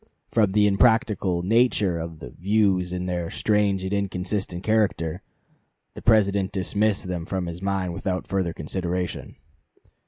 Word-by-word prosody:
"From 110 -4 +3
the 105 +2 +3
impracticable 100 -4 +2
nature 105 -4 +2
of 80 0 -6
the - - -9
'Views,' 95 -2 +1
and 90 0 -3
their 90 -2 -2
strange 105 -3 +1
and 95 +1 -3
inconsistent 95 -2 -2
character, 105 -7 0 0.7
the - - -9
President 100 -3 +3
dismissed 100 +2 0
them 90 -2 -3
from 95 +1 -3
his 85 +1 -6
mind 95 -2 -1
without 90 +1 -3
further 95 -3 -1
consideration." 90 +2 -4
95 Hz, 135 wpm, -24 LUFS, 90-105 Hz, 0.7 s, From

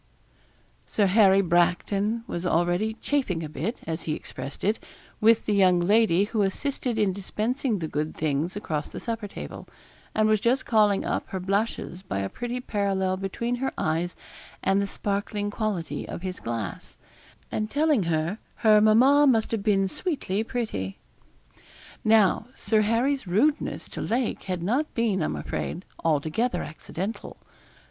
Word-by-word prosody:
Sir 210 - +2
Harry 195 0 +5
Bracton 195 +5 +1
was 175 -7 -4
already 175 +5 +1
'chaffing 230 - 0
a - - -3
bit,' 175 - -4
as 160 +1 -3
he 155 - -1
expressed 135 -1 -8
it, 210 +3 +1 0.4
with 225 +1 +4
the 210 - +1
young 185 -3 +5
lady 200 0 +4
who 215 +1 -1
assisted 245 +4 -1
in 205 -3 +2
dispensing 220 +5 -1
the 165 -3 -3
good 155 +1 -3
things 155 +4 -1
across 155 -7 -3
the - - -7
supper 225 -2 -4
table, - - -8 0.5
and 215 0 +3
was 215 -1 +3
just 245 +5 +1
calling 210 -3 +3
up - - -2
her 190 - -4
blushes 195 -1 -2
by 180 - -4
a 100 0 -1
pretty 245 +1 -4
parallel 195 -5 0
between 215 +6 -2
her 265 +2 -1
eyes 165 +3 -1 0.5
and 195 +1 +3
the 200 - -1
sparkling 205 +1 -2
quality 180 -10 -3
of 175 - -6
his 185 -1 -4
glass, 115 -7 -5 0.5
and 215 0 -2
telling 295 -3 +2
her 165 +5 0 0.3
her 215 -1 +7
mamma 260 +7 +6
must 225 -4 +3
have 225 -3 0
been 195 -2 +2
sweetly 220 - -2
pretty. 215 - -3 1.1
Now, 220 0 +4
Sir 220 -1 +2
Harry's 235 +3 +1
rudeness 255 +12 +1
to - - -6
Lake 240 +1 -1
had 180 -3 -3
not 255 - 0
been, 220 -6 +1
I - - +1
am - - -2
afraid, 180 - -4 0.2
altogether 160 - +1
accidental. 185 +7 -6
200 Hz, 155 wpm, -26 LUFS, 175-225 Hz, 1.1 s, her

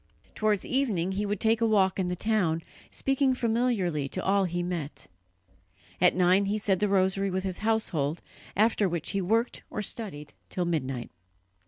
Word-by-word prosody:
Towards 215 -2 0
evening 215 -10 +1
he 205 +2 -2
would 205 -1 -2
take 225 +1 +2
a 230 - +4
walk 195 -3 +2
in 185 - 0
the 180 - -2
town, 180 -5 0 0.3
speaking 270 -1 +1
familiarly 220 - 0
to 185 - -4
all 195 0 +3
he 175 0 -2
met. 170 -5 -5 1.0
At 180 - +5
nine 185 +2 +4
he 205 +2 0
said 200 -3 +1
the 210 0 +1
rosary 195 0 +2
with 185 0 -2
his 190 -2 -3
household, 180 -9 -1 0.3
after 210 -1 +3
which 170 -2 -2
he 200 - -1
worked 225 +6 0
or 210 - -4
studied 180 -10 -5 0.2
till 180 - -2
midnight. 135 -7 -2
195 Hz, 170 wpm, -28 LUFS, 175-215 Hz, 1.0 s, At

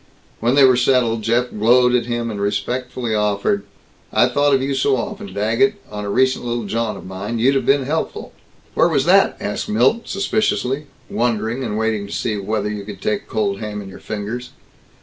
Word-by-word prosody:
When 120 +3 +2
they 140 - +6
were 130 -2 +6
settled, 120 -3 +2
Jeff 120 +3 +1
glowed 125 +3 +4
at 120 -1 +1
him, 120 -1 -2
and 100 -2 -5
respectfully 120 +3 -2
offered, 100 -1 0 0.5
"I 120 - +4
thought 145 +2 +3
of - - +2
you 135 +1 -1
so 135 0 +2
often, 205 0 -5
Daggett, 115 - +2 0.2
on 105 0 -5
a - - -3
recent 130 +5 +2
little 120 -1 -2
jaunt 110 0 -2
of - - -11
mine. 95 +5 -4
You'd 125 +5 +3
have 135 - 0
been 140 0 +4
helpful." 155 +4 -3 0.4
"Where - - +3
was - - +1
that?" - - +4
asked - - -3
Milt 125 - +2
suspiciously 150 - 0 0.2
(wondering, 115 +1 -1
and 105 -3 -2
waiting 110 -2 -1
to - - -8
see, 110 - -1
whether 105 +1 -2
you 105 -1 -4
could 100 -2 -9
take 105 0 -2
cold 100 -2 -1
ham 105 -1 -5
in 100 -1 -8
your - - -11
fingers). 110 +4 -5
115 Hz, 195 wpm, -20 LUFS, 105-130 Hz, 0.5 s, they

